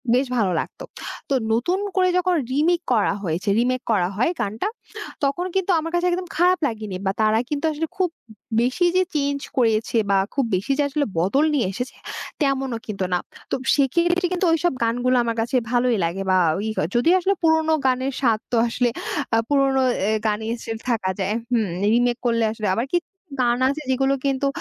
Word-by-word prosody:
বেশ 260 +2 +2
ভালো 200 -5 +2
লাগতো। - - -6 0.5
তো - - +1 0.2
নতুন 255 +12 +1 0.2
করে 370 -1 +3
যখন 365 0 +2 0.2
রিমেক 330 +6 +2
করা 215 -3 +2
হয়েছে, 175 +4 -2
রিমেক 250 +1 +1
করা 190 -5 +2
হয় 235 +10 +2
গানটা, 215 - -2 0.6
তখন 280 +6 0
কিন্তু 385 0 +1
আমার 330 +1 -4
কাছে 350 +1 +1
একদম 360 +1 -2
খারাপ 360 +2 +4
লাগেনি 215 -5 -5
বা 190 - +2
তারা 215 0 +3
কিন্তু 295 +1 -2
আসলে 315 +2 -3
খুব 370 -2 +2 0.5
বেশি 255 +9 +1
যে 370 - +4
চেঞ্জ 285 -1 0 0.2
করেছে 230 -1 +2
বা 195 - +4 0.2
খুব 275 -2 +1
বেশি 195 +9 -2
যে - - +4
আসলে 290 +1 0
বদল 265 - +2
নিয়ে 260 -9 +1
এসেছে, 250 +6 -5 0.5
তেমনও 270 -4 0
কিন্তু 195 -3 -3
না। 180 - +2 0.3
তো - - +2 0.2
সেক্ষেত্রে 345 +6 +2
কিন্তু 365 +1 0
ওইসব 330 0 +1
গানগুলো 245 +2 +1
আমার 230 -1 -1
কাছে 235 +4 -2 0.2
ভালোই 245 -2 +2
লাগে 175 +4 -3
বা - - +4 0.2
ওই 205 +3 -3 0.3
যদিও 325 +10 +4
আসলে 380 +2 +1
পুরোনো 320 -1 +3
গানের 260 +1 +1
স্বাদ 230 -5 +3
তো - - +1
আসলে 245 +1 +1 0.5
আ - - +4
পুরোনো 275 -2 +3 0.3
এ - - +2 0.2
গানে 215 +1 -1 0.2
স্টিল 225 0 -4
থাকা 215 -6 0
যায় 195 +2 0 0.2
হুম, 225 -4 +2 0.3
রিমেক 240 0 +2
করলে 230 -1 +2
আসলে 215 -2 -3
আবার 235 +5 -1
কিছু 350 -1 +1 0.3
গান 240 -1 +2
আছে, 290 +3 -3
যেগুলো 270 +1 +2
কিন্তু 275 0 +1
255 Hz, 185 wpm, -22 LUFS, 225-310 Hz, 0.6 s, খারাপ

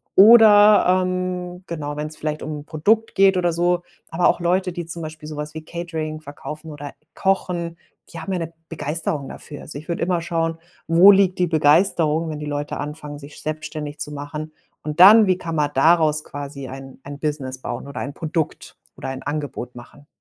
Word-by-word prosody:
Oder, 210 -1 +8 0.2
ähm, 180 0 -4
genau, 150 -3 -5
wenn's 150 +1 -5
vielleicht 155 0 -3
um 150 -1 -5
'n - - -16
Produkt 215 +9 +1
geht 195 -1 +4
oder 175 -2 +1
so. 175 +1 +1 0.3
Aber 170 +2 +2
auch - - +2
Leute, 180 +2 +1
die 175 -2 -6
zum 165 -1 -5
Beispiel 155 -1 -8
so 155 - -7
was 150 +1 -5
wie 160 0 -7
Catering 160 -2 -5
verkaufen 155 +1 -9
oder 145 -1 -8 0.2
kochen, 175 -3 -1 0.3
die 170 - -8
haben 190 +4 -4
ja 180 - -1
'ne 165 0 -5 0.2
Begeisterung 155 -1 -2
dafür. 145 -2 -10
Also, 145 - -9
ich 155 - -10
würde 170 - -3
immer 175 -1 0
schauen: 165 -1 -2 0.3
Wo 175 +5 +8
liegt 190 -2 +3
die 180 - +2
Begeisterung, 160 0 +3
wenn 150 - -6
die 150 - -5
Leute 145 0 -3
anfangen, 150 0 -7
sich 145 +1 -12
selbstständig 155 -1 -5
zu 150 - -5
machen. 150 +2 -6 0.3
Und 150 +2 -6
dann: 210 +3 +9
Wie 185 -1 +2
kann 165 -3 -6
man 150 -1 +1
daraus 155 +1 +4
quasi 140 -1 -7
ein 135 0 -10
ein 140 0 -9
Business 140 -4 -3
bauen 140 - -6
oder 140 - -7
ein 140 +1 -5
Produkt 160 -1 -3 0.2
oder - - -6
ein 130 0 -6
Angebot 145 -5 -5
machen? 130 +4 -14
155 Hz, 195 wpm, -21 LUFS, 150-175 Hz, 0.3 s, dann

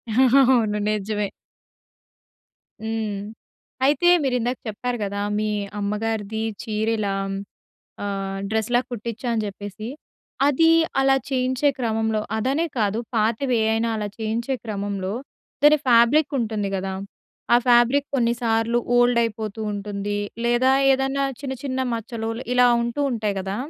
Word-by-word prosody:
అవును. 250 -4 +4
నిజమే. 210 0 -1 1.6
హ్మ్. 220 -2 -2 0.7
అయితే 295 +5 +3 0.2
మీరు 260 -2 +1
ఇందాక 245 +2 -1
చెప్పారు 240 +3 -3
గదా! 200 0 -3 0.2
మీ 215 - 0 0.3
అమ్మగారిది 210 +1 -2 0.2
చీరల 220 -1 -1
హ్మ్, 195 0 -3 0.7
ఆహ్, 195 -1 -3
డ్రెస్‌లా 220 +2 +1
కుట్టిచ్చా 235 +1 -5
అని 220 -1 0
జెప్పేసి. 205 +2 -7 0.6
అది 305 +3 +4 0.3
అలా 270 0 +4
చేయించే 260 +2 +1
క్రమంలో 220 -2 0 0.2
అదనే 270 +9 0
కాదు. 210 0 +1 0.2
పాతవేవైనా 225 0 +1
అలా 210 -1 -3
చేయించే 230 +4 -2
క్రమంలో 200 -2 -3 0.5
దాని 300 +1 +7
ఫ్యాబ్రిక్ 245 +5 +5
ఉంటుంది 215 -4 -1
గదా! 190 0 -3 0.6
ఆ - - +8
ఫ్యాబ్రిక్ 245 +4 +5
కొన్నిసార్లు 235 -1 +1 0.2
ఓల్డ్ 245 0 +4
అయిపోతూ 220 -1 -3
ఉంటుంది. 205 0 -3 0.3
లేదా 240 +2 +3 0.2
ఏదన్నా 270 +1 0 0.2
చిన్న 265 -2 -4
చిన్న 260 -1 -2
మచ్చలు 225 0 -4 0.3
ఇలా 250 0 +6
ఉంటూ 235 +4 -3
ఉంటాయి 210 -3 -1
గదా! 195 +1 -4
225 Hz, 115 wpm, -23 LUFS, 210-250 Hz, 1.6 s, ఆ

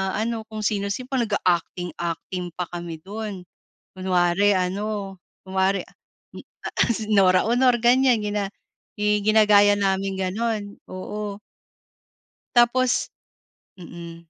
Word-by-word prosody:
ano 225 +1 -2
kung 215 -1 -6
sino-sino 200 +5 -1
parang 260 -3 +1
naga-acting 180 -2 0
acting 175 +1 -4
pa 180 - -2
kami 170 -1 -5
dun 205 -2 -6 0.5
kunwari 185 +2 +2
ano 195 +1 -3 0.3
kunwari 190 0 +1
a - - -20 0.4
m - - -7 0.3
ah - - -3 0.2
si 220 -1 -3
Nora 185 -3 +5
Aunor 245 +1 +4
ganyan 250 0 +5
gina 205 -1 -1 0.5
i 210 0 +2
ginagaya 210 -1 +6
naming 195 0 0
ganon, 205 +2 -2
oo. 200 +2 -5 1.2
Tapos, 245 +1 +3 0.7
mm. 170 -2 -9
205 Hz, 115 wpm, -23 LUFS, 185-220 Hz, 1.2 s, ginagaya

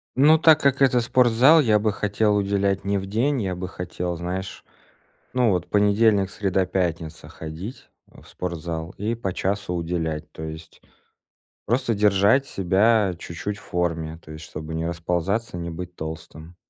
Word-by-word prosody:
Ну, 150 +4 +6
так 160 -1 +6
как 140 -2 +2
это 125 -2 +5
спортзал, 125 +5 +5
я 110 -6 +3
бы 105 0 0
хотел 105 +1 +1
уделять 100 -1 0
не 100 0 0
в 95 - -4
день, 120 +7 0
я 95 -3 -2
бы 90 +1 -5
хотел, 90 -1 -4
знаешь, 90 +2 -5 0.7
ну 125 -3 +3
вот, 90 -3 0
понедельник, 105 -1 +3
среда, 95 -2 0
пятница- 85 -4 -3
ходить 80 - -8 0.2
в - - -18
спортзал 85 -1 -5
и 110 +3 -2
по 100 -6 -4
часу 100 -1 -2
уделять, 80 -3 -3
то - - -9
есть 80 +1 -9 0.9
просто 120 0 0
держать 105 +6 +3
себя 100 -1 +2
чуть-чуть 90 +5 -5
в - - -15
форме, 80 -2 -2
то 80 - -12
есть 80 0 -9
чтобы 80 +1 -7
не 80 0 -2
расползаться, 90 +5 -2
не 85 0 -5
быть 90 +1 -7
толстым. 80 +1 -8
95 Hz, 160 wpm, -23 LUFS, 85-110 Hz, 0.9 s, Ну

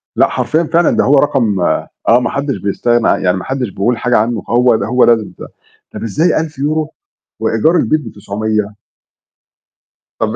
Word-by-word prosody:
لأ، - - +4
حرفيًا 160 +2 0
فعلًا 170 +1 +2
ده - - +3
هو 140 - +3
رقم 120 -8 +1 0.5
آه، 120 - +6
ما 125 - -2
حدّش 140 -1 -2
بيستغنى 120 +4 0
ع - - +2
يعني 90 0 0
ما 90 - -6
حدّش 130 -4 -3
بيقول 110 +5 -1
حاجة 125 0 +1
عنّه، 110 0 -1
هو 120 +1 +3
د - - -2
هو 125 +2 +2
لازم 115 -3 +2
ده. - - -8 0.5
طَب - - -7
إزاي 155 - +1
1000€ 155 0 -3 0.5
وإيجار 165 +3 +1
البيت 150 -10 -1
ب900؟ 105 0 -3 1.4
طَب - - -1
120 Hz, 170 wpm, -14 LUFS, 110-145 Hz, 1.4 s, آه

